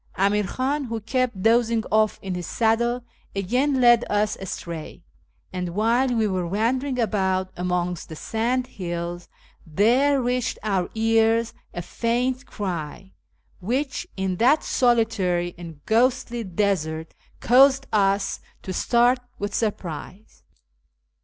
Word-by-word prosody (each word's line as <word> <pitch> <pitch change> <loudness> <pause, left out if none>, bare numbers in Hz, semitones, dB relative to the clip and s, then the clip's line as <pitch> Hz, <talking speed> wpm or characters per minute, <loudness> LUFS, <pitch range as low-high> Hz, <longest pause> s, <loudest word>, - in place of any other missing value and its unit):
Amir 200 +2 +2
Khan, 275 +7 -1
who 230 -2 -3
kept 235 -3 -1
dozing 230 0 +3
oft' 215 0 +3
in 190 -1 -3
his 180 -2 -4
saddle, 235 +2 +1 0.3
again 250 +8 +1
led 240 -1 +6
us 210 0 +1
astray; 170 -3 -7 0.5
and, 180 -1 -4
while 230 +5 +2
we 230 -4 +1
were 185 -3 -1
wandering 250 +8 0
about 190 -5 0
amongst 180 -1 -2
the 160 - -7
sandhills, 180 -7 -3 0.3
there 245 - +3
reached 250 -1 -1
our 195 -4 0
ears 225 +1 +2 0.2
a 175 - -5
faint 245 +7 -1
cry, 165 - -5 0.5
which, 260 +8 -2
in 190 -1 -1
that 265 - +4
solitary 195 -8 +1
and 165 -4 -11
ghostly 240 +1 +1
desert, 170 -5 -1 0.3
caused 270 +2 +5
us 195 -1 +2 0.2
to 185 - -5
start 240 +5 +3 0.2
with 205 0 -4
surprise. 195 -2 -4
220 Hz, 120 wpm, -24 LUFS, 185-245 Hz, 0.5 s, led